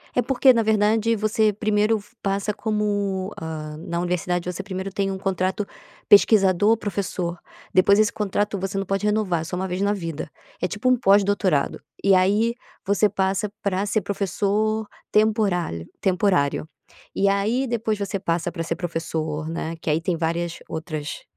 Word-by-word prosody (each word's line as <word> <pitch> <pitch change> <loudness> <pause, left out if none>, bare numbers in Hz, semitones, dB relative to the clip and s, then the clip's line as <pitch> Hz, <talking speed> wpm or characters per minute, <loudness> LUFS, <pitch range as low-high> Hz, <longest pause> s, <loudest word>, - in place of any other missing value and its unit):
É 250 - +4
porque, 265 0 +4
na 230 -1 +2
verdade 220 +1 +2
você 215 +1 +1
f - - -1
primeiro 215 +1 +1 0.2
passa 200 +1 -1
como, 205 -3 -1
hã, 155 -1 -6
na 170 +1 -4
universidade 180 0 -1
você 195 +3 -6
primeiro 190 0 -5
tem 195 0 -1
um 190 - -3
contrato 190 +1 -1 0.4
pesquisador 205 0 +5
professor, 185 -4 -3 0.4
depois 200 +3 +5
desse 215 - +4
contrato 205 0 -1
você 195 +1 -3
não 195 - -1
pode 195 +2 -1
renovar, 210 -6 +1
é - - -4
só 180 - -5
uma 190 +1 -2
vez 180 +2 -3
na 200 +1 +2
vida. 165 -6 -5 0.3
É 180 - +1
tipo 210 +6 -1
um 255 - +4
pós-doutorado. 200 - +2 0.2
E 195 -1 +5
aí 210 +6 +3 0.3
você 205 +2 +3
passa 195 +1 -1
pra 200 0 0
ser 210 +1 0
professor 205 +2 -1 0.2
temporálio 200 - +1 0.2
temporário. 180 -6 +1 0.5
E 200 0 +3
aí 220 +7 +1
depois 225 -3 -1
você 200 -1 -2
passa 170 -1 -1
pra 165 -2 -4
ser 165 - -2
professor, 160 -3 -3
né, 165 0 -4
que - - -3
aí 155 +2 +2
tem 170 -1 -1
várias 170 +1 -2
outras, 155 -2 -5
195 Hz, 165 wpm, -23 LUFS, 175-210 Hz, 0.5 s, pesquisador